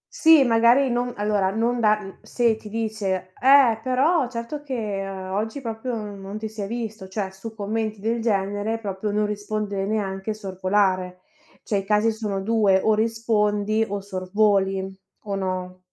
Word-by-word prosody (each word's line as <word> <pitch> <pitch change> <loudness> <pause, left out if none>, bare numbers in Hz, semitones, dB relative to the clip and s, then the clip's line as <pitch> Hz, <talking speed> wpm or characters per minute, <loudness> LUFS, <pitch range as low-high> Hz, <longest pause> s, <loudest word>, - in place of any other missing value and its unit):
Sì 320 - +7
magari 240 +3 +4
non 245 +1 0
allora, 205 -2 +1
non 230 +4 0
dar 215 -2 +3
mhmm, 195 0 -10
se 235 -2 +1
ti 215 -1 -11
dice: 205 -4 -2
"Eh 260 -4 +6
però 260 +4 +2
certo 235 +5 -5
che 220 -8 -3
oggi 195 +6 -3
proprio 235 0 -4
non 205 -2 -6
ti 220 +1 -4
si 215 0 -7
è 200 - -3
visto". 220 -3 -5
Cioè 190 0 -3
su 215 +4 -9
commenti 215 0 -3
del 225 +3 -1
genere 205 0 0
proprio 205 -1 -4
non 210 +1 +1
rispondere 205 -1 -3
neanche, 205 0 -2
sorvolare. 185 -2 0 0.4
Cioè 210 - -1
i 195 - -1
casi 210 +3 +2
sono 210 -3 -3
2 205 -3 +3
o 220 - +4
rispondi 215 -1 +1
o 200 0 -3
sorvoli. 195 0 0 0.3
O 200 -1 -2
no? 185 -1 -3
210 Hz, 160 wpm, -24 LUFS, 195-225 Hz, 0.4 s, Sì